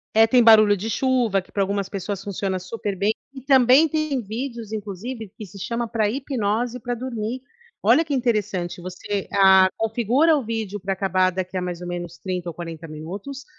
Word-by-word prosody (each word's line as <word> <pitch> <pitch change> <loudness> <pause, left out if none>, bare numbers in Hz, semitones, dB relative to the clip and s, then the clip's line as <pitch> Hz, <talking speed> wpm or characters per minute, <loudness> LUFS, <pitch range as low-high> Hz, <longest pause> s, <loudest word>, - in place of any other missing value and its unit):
É, 220 +1 +7
tem 245 +2 +4
barulho 215 -2 +7
de 205 +3 -4
chuva, 240 -4 +1
que - - -22
pra 200 - -1
algumas 200 0 -1
pessoas 195 0 -5
funciona 195 -1 -2
super 195 +2 -4
bem. 205 +3 +2 0.2
E 265 - -9
também 265 +3 +5
tem 310 -4 -1
vídeos, 230 0 -5
inclusive, 215 +2 -6
que 215 - -7
se 195 +2 -12
chama 235 +4 -2
pra 220 -2 0
hipnose 245 -2 -2
pra 245 +1 -3
dormir. 235 0 -4 0.4
Olha 245 +10 +5
que 300 -3 -4
interessante, 210 -9 -1
você, 185 +2 -4
ah, 190 -1 +6
configura 240 +8 +2
o 280 - -1
vídeo 220 -3 -4
pra 195 0 -2
acabar 190 -1 +2
daqui 185 0 -5
a 185 - 0
mais 180 -1 -4
ou 180 - -7
menos 175 -1 -5
30 180 -2 -4
ou - - -7
40 165 -1 -7
minutos, 195 - -7
210 Hz, 190 wpm, -23 LUFS, 190-245 Hz, 0.4 s, É